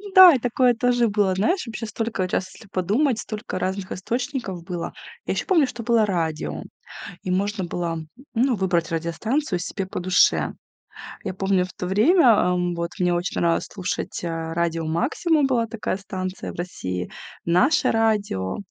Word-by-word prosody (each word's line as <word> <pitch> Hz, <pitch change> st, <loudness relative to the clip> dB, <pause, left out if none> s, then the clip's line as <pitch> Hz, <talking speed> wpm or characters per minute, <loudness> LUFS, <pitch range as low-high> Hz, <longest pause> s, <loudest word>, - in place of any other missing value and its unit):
Да, 370 Hz, -2 st, +11 dB
и 265 Hz, -, +1 dB
такое 245 Hz, +1 st, +3 dB
тоже 245 Hz, 0 st, +2 dB
было. 205 Hz, -3 st, +2 dB
Знаешь, 345 Hz, -, +1 dB
вообще 230 Hz, -1 st, -5 dB
столько 220 Hz, -4 st, -2 dB
раз, 185 Hz, +1 st, -2 dB
если 220 Hz, -, -15 dB
подумать, 215 Hz, -, +1 dB
столько 215 Hz, -1 st, -5 dB
разных 190 Hz, 0 st, -3 dB
источников 235 Hz, -, -3 dB
было. 175 Hz, -1 st, -5 dB, 0.3 s
Я -, -, -1 dB
ещё -, -, -2 dB
помню, 335 Hz, -7 st, +4 dB
что 240 Hz, -, -7 dB
было 230 Hz, -2 st, +3 dB
радио, 165 Hz, -5 st, -2 dB, 0.6 s
и -, -, -5 dB
можно 200 Hz, +2 st, 0 dB
было, 170 Hz, -1 st, -3 dB, 0.3 s
ну, 250 Hz, +1 st, +2 dB
выбрать 175 Hz, -4 st, 0 dB
радиостанцию 180 Hz, -, -1 dB
себе 190 Hz, +2 st, -4 dB
по 185 Hz, -, -5 dB
душе. 180 Hz, +1 st, +3 dB, 0.7 s
Я -, -, -2 dB
помню 190 Hz, -1 st, +1 dB
в 185 Hz, -, -9 dB
то 180 Hz, -, -5 dB
время, 245 Hz, -, +4 dB
м, 180 Hz, -5 st, +3 dB
вот 170 Hz, 0 st, -3 dB
мне 180 Hz, -1 st, +2 dB
очень 175 Hz, +2 st, -2 dB
нравилось 170 Hz, -1 st, +1 dB
слушать, 185 Hz, -3 st, -4 dB
э, -, -, -1 dB, 0.2 s
радио 165 Hz, -1 st, -1 dB
"Максимум", 280 Hz, -, +1 dB
была 240 Hz, -4 st, +1 dB
такая 220 Hz, -3 st, -3 dB
станция 190 Hz, -1 st, -5 dB
в -, -, -13 dB
России, 90 Hz, -, -4 dB, 0.3 s
"Наше 270 Hz, -, +3 dB
радио". 210 Hz, -, 0 dB
195 Hz, 165 wpm, -23 LUFS, 175-235 Hz, 0.7 s, Да